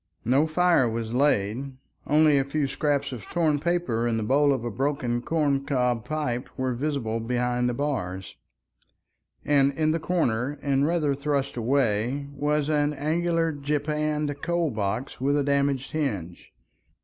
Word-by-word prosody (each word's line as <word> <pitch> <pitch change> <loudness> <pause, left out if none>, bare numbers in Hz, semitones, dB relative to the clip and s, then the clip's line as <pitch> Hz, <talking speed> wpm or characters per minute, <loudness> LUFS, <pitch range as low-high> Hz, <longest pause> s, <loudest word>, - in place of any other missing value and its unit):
No 135 +7 +3
fire 165 -5 +3
was 115 0 -4
laid, 130 -1 +1 0.3
only 150 -1 +5
a - - +2
few 140 +2 -1
scraps 140 +1 -1
of 120 -6 -7
torn 155 -4 +1
paper 160 -8 0
and 115 -1 0
the 110 - -1
bowl 140 +6 +3
of 130 -4 -1
a 120 - -2
broken 130 -1 -1
corn 145 -2 0
cob 125 -5 0
pipe 145 -6 -2
were 130 -1 -1
visible 120 -4 -2
behind 125 +1 0
the 120 - -2
bars, 95 -10 -3 1.1
and 140 -1 +4
in 155 +2 +1
the 165 - 0
corner 145 -6 0
and 140 0 +2
rather 160 -4 +1
thrust 140 0 -1
away 125 +1 0
was 150 +1 0
an 150 -1 +1
angular 165 +3 0
japanned 150 0 -2
coal 170 -3 0
box 110 +5 -3
with 140 +2 +2
a 145 - +1
damaged 140 -1 0
hinge. 100 - -3
140 Hz, 150 wpm, -26 LUFS, 125-150 Hz, 1.1 s, only